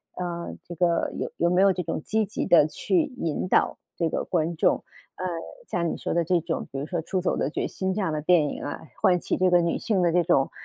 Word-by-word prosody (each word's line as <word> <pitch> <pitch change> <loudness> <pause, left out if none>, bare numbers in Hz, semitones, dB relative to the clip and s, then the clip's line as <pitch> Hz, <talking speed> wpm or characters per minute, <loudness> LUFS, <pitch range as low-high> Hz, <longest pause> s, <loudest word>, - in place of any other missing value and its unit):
呃， 175 -1 -4
这 175 - -7
个 170 -1 +1
有 - - -3
有 170 - +2
没 180 +2 +3
有 195 -1 +5
这 180 - -2
种 165 -1 -3
积 220 0 +1
极 205 - -3
地 160 -3 +6
去 340 - +1
引 165 0 -2
导 - - +2 0.2
这 165 - +1
个 - - -1
观 165 -1 -1
众， - - +3 0.4
呃， 185 - -5 0.4
像 170 -2 -1
你 - - -4
说 - - -3
的 170 0 +2
这 175 +2 +2
种， 165 0 -3
比 135 - -5
如 145 - -3
说 170 0 -2
《出 190 - -1
走 180 - 0
的 140 - 0
决 - - -2
心》， 190 - -3
这 - - -2
样 165 -5 -1
的 150 - -2
电 160 -2 +4
影 - - -5
啊， 145 - -4 0.2
唤 185 -4 +4
起 - - -1
这 185 0 +3
个 175 0 +5
女 170 - 0
性 200 -5 +1
的 170 - +3
这 175 0 +4
种 135 -3 +2
175 Hz, 275 characters per minute, -26 LUFS, 165-185 Hz, 0.4 s, 地